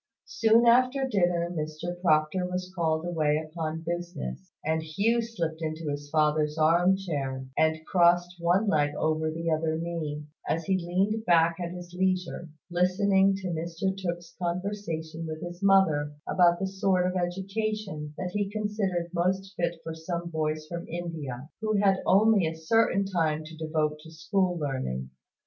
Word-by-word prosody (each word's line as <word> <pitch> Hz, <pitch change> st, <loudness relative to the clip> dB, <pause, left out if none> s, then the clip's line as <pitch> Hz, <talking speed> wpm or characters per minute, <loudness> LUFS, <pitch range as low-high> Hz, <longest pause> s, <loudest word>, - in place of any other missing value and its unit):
Soon 225 Hz, +1 st, +4 dB
after 255 Hz, +3 st, +4 dB
dinner 175 Hz, -6 st, +1 dB
Mr 165 Hz, +2 st, -4 dB
Proctor 160 Hz, +2 st, +2 dB
was 180 Hz, 0 st, -4 dB
called 160 Hz, -2 st, 0 dB
away 155 Hz, -4 st, +1 dB
upon 160 Hz, 0 st, -4 dB
business; 170 Hz, -, -5 dB
and 160 Hz, +1 st, +1 dB
Hugh 200 Hz, +10 st, +1 dB
slipped 170 Hz, -9 st, -4 dB
into 155 Hz, -1 st, -3 dB
his 145 Hz, 0 st, -5 dB
father's 150 Hz, 0 st, +2 dB
arm 170 Hz, +4 st, +4 dB
chair, 135 Hz, -8 st, -3 dB
and 160 Hz, 0 st, +1 dB
crossed 175 Hz, 0 st, +3 dB
one 175 Hz, +5 st, +2 dB
leg 145 Hz, -5 st, +2 dB
over 155 Hz, 0 st, +1 dB
the 165 Hz, +1 st, -2 dB
other 160 Hz, 0 st, 0 dB
knee, 160 Hz, -3 st, -4 dB, 0.2 s
as 165 Hz, 0 st, 0 dB
he 195 Hz, -, +2 dB
leaned 190 Hz, +5 st, 0 dB
back 165 Hz, -2 st, +4 dB
at 175 Hz, -1 st, -3 dB
his 175 Hz, 0 st, -9 dB
leisure, 180 Hz, -2 st, -1 dB, 0.2 s
listening 190 Hz, +2 st, +3 dB
to 190 Hz, -1 st, -4 dB
Mr 170 Hz, +3 st, -2 dB
Tooke's 175 Hz, -3 st, -5 dB
conversation 170 Hz, -3 st, -3 dB
with 155 Hz, 0 st, -6 dB
his 175 Hz, +1 st, -7 dB
mother 165 Hz, -7 st, +4 dB
about 175 Hz, -2 st, +4 dB
the 195 Hz, -, 0 dB
sort 190 Hz, -1 st, +1 dB
of 180 Hz, 0 st, -1 dB
education 190 Hz, -3 st, -3 dB
that 180 Hz, -1 st, -3 dB
he 205 Hz, -1 st, 0 dB
considered 205 Hz, -5 st, -2 dB
most 190 Hz, +3 st, 0 dB
fit 170 Hz, -1 st, 0 dB
for 165 Hz, -, -5 dB
some 170 Hz, +1 st, -4 dB
boys 155 Hz, -1 st, -1 dB
from 170 Hz, +2 st, -6 dB
India, 155 Hz, -6 st, -5 dB
who 215 Hz, -1 st, +1 dB
had 195 Hz, -1 st, +3 dB
only 200 Hz, -2 st, +5 dB
a 160 Hz, -, -3 dB
certain 200 Hz, +4 st, +2 dB
time 160 Hz, -5 st, 0 dB
to 160 Hz, +1 st, -10 dB
devote 155 Hz, -1 st, -1 dB
to 160 Hz, +1 st, -13 dB
school 180 Hz, +3 st, 0 dB
learning. 130 Hz, -, -3 dB
170 Hz, 160 wpm, -28 LUFS, 155-190 Hz, 0.2 s, only